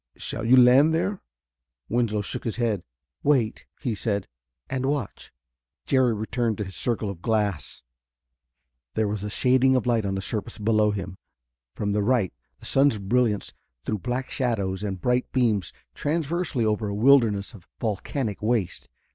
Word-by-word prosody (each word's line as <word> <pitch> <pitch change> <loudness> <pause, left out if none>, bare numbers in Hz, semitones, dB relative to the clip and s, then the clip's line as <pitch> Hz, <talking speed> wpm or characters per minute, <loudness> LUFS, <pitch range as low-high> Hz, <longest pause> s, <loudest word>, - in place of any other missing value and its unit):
Shall 115 - -4
you 130 +2 +7
land 130 +6 +6
there?" 185 +4 -1 0.7
Winslow 115 -3 0
shook - - -3
his 115 - -2
head. 115 -6 0 0.4
"Wait," 130 -7 +1
he 125 -6 -1
said, 100 -2 -1 0.4
"and 130 0 -2
watch." 140 -7 -3 0.5
Jerry 130 -4 +3
returned 110 +1 -1
to 105 - -2
his 95 -1 -8
circle 115 -3 -1
of 90 -3 -11
glass. 105 - -1 1.1
There 110 - +1
was 105 -1 -3
a 105 - -3
shading 130 +4 +3
of 130 - +1
light 115 -3 +2
on 95 -1 -1
the - - -2
surface 110 +3 -3
below 110 0 +2
him. 95 -2 -5 0.6
From 105 -1 -1
the 105 +1 +1
right 110 -3 +1 0.3
the - - -13
sun's 135 -4 +3
brilliance 105 +1 0 0.3
threw 105 - -2
black 125 +4 -3
shadows 100 -7 -1
and 100 -3 -3
bright 125 +4 0
beams 110 -9 +1 0.2
transversely 155 - -1
over 105 0 0
a 100 - -3
wilderness 110 -4 +4
of 95 -6 -14
volcanic 110 +1 -2
waste. 110 -4 -1
110 Hz, 155 wpm, -25 LUFS, 105-125 Hz, 1.1 s, you